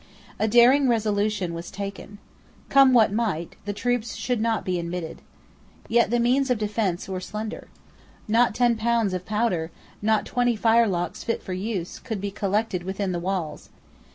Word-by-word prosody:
A 220 Hz, -, +2 dB
daring 250 Hz, +4 st, +5 dB
resolution 210 Hz, -5 st, 0 dB
was 170 Hz, +1 st, -6 dB
taken. 200 Hz, +1 st, -7 dB, 0.5 s
Come 275 Hz, -1 st, +6 dB
what 225 Hz, -5 st, +5 dB
might, 205 Hz, -8 st, -2 dB
the 205 Hz, -, -2 dB
troops 235 Hz, +2 st, -2 dB
should 245 Hz, -3 st, -1 dB
not 225 Hz, -1 st, 0 dB
be 180 Hz, -1 st, -1 dB
admitted. 170 Hz, -1 st, -5 dB, 0.7 s
Yet 235 Hz, +1 st, +3 dB
the 240 Hz, +1 st, +1 dB
means 255 Hz, +3 st, +2 dB
of 250 Hz, -, +2 dB
defence 210 Hz, -4 st, -1 dB
were 190 Hz, -1 st, -3 dB
slender. 215 Hz, +4 st, -6 dB, 0.6 s
Not 230 Hz, +1 st, +3 dB
ten 240 Hz, -2 st, +3 dB
pounds 225 Hz, -3 st, +1 dB
of 185 Hz, 0 st, -4 dB
powder, 210 Hz, -7 st, 0 dB, 0.3 s
not 215 Hz, 0 st, +2 dB
twenty 245 Hz, -1 st, +1 dB
firelocks 220 Hz, -5 st, +1 dB
fit 230 Hz, -, -2 dB
for 185 Hz, -, -5 dB
use, 185 Hz, -2 st, -4 dB
could 220 Hz, -5 st, -5 dB
be 200 Hz, +1 st, -4 dB
collected 200 Hz, -1 st, -1 dB
within 190 Hz, +1 st, -3 dB
the 175 Hz, -, -2 dB
walls. 180 Hz, -3 st, -4 dB
215 Hz, 160 wpm, -25 LUFS, 190-235 Hz, 0.7 s, Come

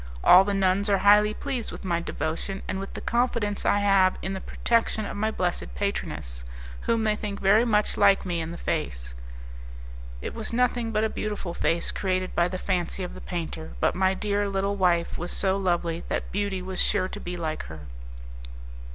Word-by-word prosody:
All 185 Hz, +2 st, +9 dB
the 200 Hz, 0 st, -1 dB
nuns 195 Hz, +1 st, +2 dB
are 200 Hz, -, +4 dB
highly 210 Hz, +2 st, +6 dB
pleased 260 Hz, -5 st, -3 dB
with -, -, -9 dB
my 170 Hz, -2 st, +1 dB
devotion 170 Hz, +4 st, -3 dB
and 190 Hz, -, -2 dB
with 195 Hz, -, -7 dB
the -, -, -5 dB
confidence 235 Hz, -4 st, 0 dB
I 205 Hz, -, +3 dB
have 195 Hz, -2 st, +4 dB
in 190 Hz, -, -2 dB
the 190 Hz, -, -5 dB
protection 230 Hz, -2 st, 0 dB
of -, -, -5 dB
my 215 Hz, +2 st, 0 dB
blessed 175 Hz, -, -2 dB
patroness, -, -, -3 dB, 0.4 s
whom 230 Hz, -1 st, +2 dB
they 215 Hz, -1 st, +2 dB
think 205 Hz, -1 st, -5 dB
very 210 Hz, +4 st, +5 dB
much 210 Hz, -3 st, +1 dB
like 200 Hz, -1 st, +5 dB
me 175 Hz, -2 st, -1 dB
in 160 Hz, -, -4 dB
the 170 Hz, -, -6 dB
face." -, -, -3 dB, 1.1 s
It -, -, -5 dB
was 225 Hz, -1 st, -3 dB
nothing 240 Hz, -1 st, +1 dB
but 215 Hz, 0 st, +1 dB
a -, -, +3 dB
beautiful 210 Hz, -5 st, -4 dB
face 170 Hz, 0 st, 0 dB
created 185 Hz, -1 st, -1 dB
by 175 Hz, -, +3 dB
the 185 Hz, +1 st, -4 dB
fancy 185 Hz, 0 st, -1 dB
of 180 Hz, -, -5 dB
the -, -, -9 dB
painter, 165 Hz, -2 st, -5 dB
but -, -, +2 dB
my 190 Hz, +1 st, +2 dB
dear 205 Hz, 0 st, 0 dB
little 195 Hz, +1 st, 0 dB
wife 175 Hz, -3 st, +1 dB
was 175 Hz, +1 st, -3 dB
so 190 Hz, -1 st, +1 dB
lovely 175 Hz, -3 st, -1 dB
that -, -, -3 dB
beauty 195 Hz, -2 st, -2 dB
was 185 Hz, 0 st, -2 dB
sure 185 Hz, -2 st, +2 dB
to 205 Hz, -, -7 dB
be 175 Hz, -2 st, -5 dB
like 155 Hz, -2 st, -3 dB
her. 80 Hz, -1 st, -9 dB
195 Hz, 195 wpm, -26 LUFS, 175-210 Hz, 1.1 s, All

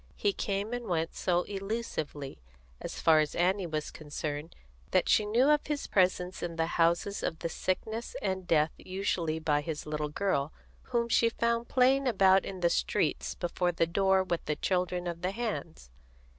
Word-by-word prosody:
He 410 Hz, -1 st, +1 dB
came 205 Hz, -, -2 dB
and 245 Hz, -1 st, -4 dB
went 165 Hz, -2 st, -1 dB
so 180 Hz, -1 st, +1 dB
elusively, 195 Hz, -9 st, -4 dB, 0.4 s
as -, -, -6 dB
far 160 Hz, -1 st, +5 dB
as 155 Hz, -1 st, 0 dB
Annie 185 Hz, +1 st, +1 dB
was 155 Hz, -2 st, -3 dB
concerned, 150 Hz, +1 st, -5 dB, 0.3 s
that -, -, +2 dB
she 210 Hz, -, +4 dB
knew 240 Hz, +6 st, +3 dB
of 300 Hz, -1 st, +2 dB
his 295 Hz, -1 st, -2 dB
presence 185 Hz, -1 st, +1 dB
in 170 Hz, -1 st, -4 dB
the 165 Hz, 0 st, +1 dB
houses 170 Hz, +4 st, +1 dB
of 160 Hz, -, -2 dB
sickness 220 Hz, +7 st, -3 dB
and 190 Hz, -2 st, -2 dB
death 155 Hz, -1 st, +3 dB
usually 185 Hz, -4 st, -2 dB
by 150 Hz, -2 st, +1 dB
his 155 Hz, -1 st, -5 dB
little 150 Hz, 0 st, -2 dB
girl, 150 Hz, -4 st, -1 dB, 0.3 s
whom 235 Hz, -2 st, 0 dB
she 230 Hz, 0 st, +4 dB
found 235 Hz, +1 st, 0 dB
playing 265 Hz, +1 st, +3 dB
about 195 Hz, -4 st, +4 dB
in 190 Hz, -2 st, -6 dB
the 170 Hz, -, +4 dB
street 65 Hz, +1 st, 0 dB
before 175 Hz, +1 st, 0 dB
the 165 Hz, -1 st, +1 dB
door 190 Hz, +2 st, +2 dB
with 175 Hz, -2 st, -2 dB
the 150 Hz, -, 0 dB
children 180 Hz, +1 st, -1 dB
of 170 Hz, -1 st, -4 dB
the 180 Hz, -, 0 dB
hands. 195 Hz, -, -5 dB
180 Hz, 170 wpm, -30 LUFS, 160-205 Hz, 0.4 s, far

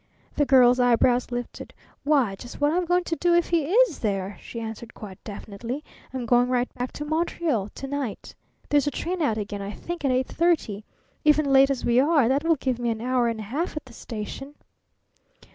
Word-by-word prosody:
The 290 Hz, -, +2 dB
Girl's 250 Hz, -1 st, +6 dB
eyebrows 245 Hz, 0 st, +3 dB
lifted. 245 Hz, 0 st, -6 dB, 0.3 s
"Why, 280 Hz, -8 st, +2 dB
just 240 Hz, +5 st, -10 dB
what 290 Hz, +1 st, +3 dB
I'm 360 Hz, +1 st, +1 dB
going 355 Hz, +1 st, +2 dB
to 335 Hz, -, -2 dB
do 345 Hz, +1 st, +2 dB
if 345 Hz, -, +2 dB
he 335 Hz, -4 st, +2 dB
is 450 Hz, 0 st, +3 dB
there," 195 Hz, -2 st, -2 dB
she 230 Hz, -, -7 dB
answered 225 Hz, 0 st, -7 dB
quite 195 Hz, -3 st, -10 dB
definitely. 230 Hz, +6 st, -6 dB, 0.3 s
"I'm 255 Hz, -2 st, -4 dB
going 245 Hz, +1 st, +4 dB
right 250 Hz, 0 st, 0 dB
back 250 Hz, 0 st, -4 dB
to 295 Hz, -, -5 dB
Montreal 315 Hz, -, -1 dB
to 270 Hz, -, -8 dB
night. 275 Hz, -6 st, -4 dB, 0.4 s
There's 290 Hz, -1 st, +3 dB
a -, -, +4 dB
train 345 Hz, +6 st, -3 dB
out 230 Hz, -8 st, +1 dB
again, 205 Hz, -1 st, -4 dB
I 200 Hz, -, -5 dB
think, 345 Hz, +6 st, -6 dB
at 275 Hz, -, +2 dB
eight 255 Hz, 0 st, +2 dB
thirty. 305 Hz, -, 0 dB, 0.4 s
Even 305 Hz, 0 st, +4 dB
late 270 Hz, 0 st, +6 dB
as 275 Hz, -2 st, -2 dB
we 240 Hz, +1 st, +4 dB
are, 290 Hz, -3 st, +4 dB
that 275 Hz, +4 st, +1 dB
will 330 Hz, 0 st, +3 dB
give 260 Hz, -3 st, -2 dB
me 240 Hz, -1 st, -1 dB
an 225 Hz, -1 st, -2 dB
hour 250 Hz, 0 st, +1 dB
and 230 Hz, -1 st, -2 dB
a -, -, -5 dB
half 295 Hz, -, -3 dB
at 305 Hz, -, -5 dB
the 255 Hz, -, -15 dB
station." 240 Hz, +6 st, -7 dB
255 Hz, 210 wpm, -25 LUFS, 230-300 Hz, 0.4 s, Girl's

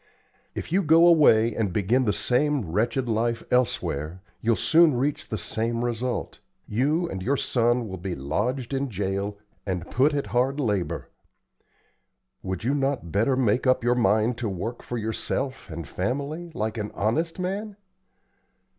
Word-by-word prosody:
If -, -, -5 dB
you 190 Hz, +3 st, +3 dB
go 165 Hz, 0 st, +6 dB
away 120 Hz, -10 st, +5 dB
and 105 Hz, -4 st, -1 dB
begin 110 Hz, +7 st, +1 dB
the 105 Hz, -, +2 dB
same 125 Hz, -, 0 dB
wretched 120 Hz, +6 st, 0 dB
life 115 Hz, +1 st, 0 dB
elsewhere, 90 Hz, -, 0 dB, 0.2 s
you'll 115 Hz, 0 st, +2 dB
soon 160 Hz, +1 st, +4 dB
reach 135 Hz, +4 st, -1 dB
the 110 Hz, -, -2 dB
same 115 Hz, +3 st, -2 dB
result; 120 Hz, +1 st, -3 dB, 0.3 s
you 150 Hz, +10 st, +1 dB
and 95 Hz, -, -5 dB
your 135 Hz, +8 st, +1 dB
son 120 Hz, -1 st, +1 dB
will 95 Hz, -2 st, -6 dB
be 90 Hz, 0 st, -4 dB
lodged 115 Hz, -, -2 dB
in 135 Hz, 0 st, -1 dB
jail 100 Hz, 0 st, -2 dB, 0.3 s
and 90 Hz, -3 st, -4 dB
put 145 Hz, +4 st, +3 dB
at 140 Hz, -, -1 dB
hard 130 Hz, +4 st, +1 dB
labor. 105 Hz, -9 st, -1 dB, 1.3 s
Would 95 Hz, 0 st, -4 dB
you 130 Hz, +4 st, +1 dB
not 135 Hz, -, -1 dB
better 115 Hz, -, +2 dB
make 125 Hz, 0 st, +1 dB
up 130 Hz, -2 st, +3 dB
your 120 Hz, +1 st, +3 dB
mind 110 Hz, 0 st, +2 dB
to 115 Hz, -4 st, -1 dB
work 110 Hz, +6 st, -4 dB
for 120 Hz, -, -5 dB
yourself 115 Hz, +4 st, -3 dB
and 80 Hz, -2 st, -6 dB
family, 140 Hz, -, -3 dB
like 110 Hz, +1 st, -2 dB
an 105 Hz, 0 st, -3 dB
honest 155 Hz, +12 st, 0 dB
man? 195 Hz, +3 st, -3 dB
120 Hz, 155 wpm, -25 LUFS, 105-140 Hz, 1.3 s, go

